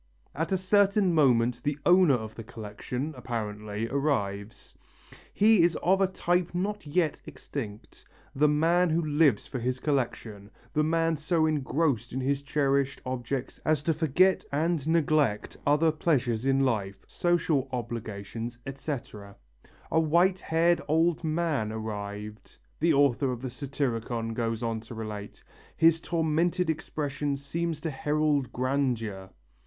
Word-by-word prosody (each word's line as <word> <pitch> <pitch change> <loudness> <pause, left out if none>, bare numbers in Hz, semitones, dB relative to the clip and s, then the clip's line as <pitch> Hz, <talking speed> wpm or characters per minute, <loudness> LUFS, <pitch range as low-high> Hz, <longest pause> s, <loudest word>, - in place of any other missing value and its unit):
At 160 +5 -3
a 190 - +3
certain 200 0 +3
moment 125 -5 +3
the 145 +2 -1
owner 180 -5 +6
of 110 -2 -5
the 115 - -8
collection, 115 +7 -6
apparently, 105 -3 -4
arrives. 110 -7 -2 0.6
He 215 -2 +5
is 170 -1 +3
of 190 +2 +3
a 195 - +4
type 175 -1 -1
not 200 -1 -2
yet 160 0 0
extinct: 110 -7 -8 0.3
the 150 +3 +4
man 165 +4 +3
who 165 +1 +1
lives 150 -6 +3
for 130 - -5
his 125 +2 -2
collection, 115 -8 -2 0.2
the 150 - +2
man 165 +1 +1
so 155 +2 +1
engrossed 140 -4 0
in 130 - -2
his 135 +1 0
cherished 140 -1 0
objects 130 0 -4
as 155 -2 +1
to 165 - +2
forget 165 +5 +3
and 155 0 0
neglect 155 -9 +1
other 150 +3 +4
pleasures 130 -7 0
in 135 0 +3
life, 100 -7 -1
social 165 -6 0
obligations, 115 -1 -5
etc. 125 -7 -6 0.6
"A 160 - +3
white 175 +4 +3
haired 170 +1 +2
old 165 +2 +2
man 155 -8 0
arrived," 105 -1 -6 0.2
the 165 +2 +3
author 140 -2 +3
of 125 0 -6
the 130 - -4
Satyricon 120 -4 -3
goes 115 0 -2
on 115 -1 -1
to 115 +1 -11
relate, 105 -2 -7 0.3
"his 165 0 +4
tormented 165 +1 +1
expression 145 -2 -3
seemed 165 +4 -3
to 160 - -1
herald 150 -1 0
grandeur. 120 -7 -1
140 Hz, 140 wpm, -28 LUFS, 115-160 Hz, 0.6 s, owner